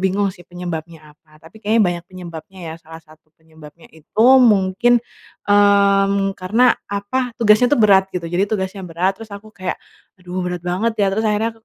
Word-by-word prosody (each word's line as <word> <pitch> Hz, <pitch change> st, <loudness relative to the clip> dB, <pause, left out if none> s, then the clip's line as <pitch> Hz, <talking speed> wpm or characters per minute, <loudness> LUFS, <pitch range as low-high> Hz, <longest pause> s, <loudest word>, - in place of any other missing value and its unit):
bingung 190 Hz, +1 st, 0 dB
sih 175 Hz, -, -18 dB
penyebabnya 165 Hz, -3 st, -8 dB
apa, 155 Hz, 0 st, -25 dB
tapi 215 Hz, +7 st, -16 dB
kayaknya 220 Hz, +1 st, +2 dB
banyak 175 Hz, -1 st, -2 dB
penyebabnya 180 Hz, 0 st, -10 dB
ya. -, -, -8 dB
Salah 160 Hz, 0 st, -12 dB
satu 155 Hz, 0 st, -22 dB
penyebabnya 160 Hz, 0 st, -17 dB
itu 160 Hz, +8 st, -2 dB, 0.2 s
mungkin, 220 Hz, +2 st, +3 dB, 0.5 s
mmm, 200 Hz, -1 st, +3 dB
karena, 225 Hz, +7 st, +3 dB, 0.2 s
apa, 230 Hz, +5 st, -3 dB
tugasnya 230 Hz, +1 st, +4 dB
tuh -, -, 0 dB
berat 195 Hz, -3 st, +4 dB
gitu, 180 Hz, -3 st, -5 dB
jadi 175 Hz, +3 st, 0 dB
tugasnya 190 Hz, -2 st, -3 dB
berat 185 Hz, +5 st, -1 dB
terus 225 Hz, -, -9 dB
aku 215 Hz, +2 st, -16 dB
kayak, 185 Hz, -3 st, -4 dB, 0.4 s
"Aduh 180 Hz, +1 st, -6 dB
berat 180 Hz, -1 st, -5 dB
banget 190 Hz, +6 st, -1 dB
ya." 200 Hz, -, +3 dB
Terus 220 Hz, -, -1 dB
akhirnya, 215 Hz, +2 st, 0 dB
190 Hz, 170 wpm, -19 LUFS, 175-210 Hz, 0.5 s, tugasnya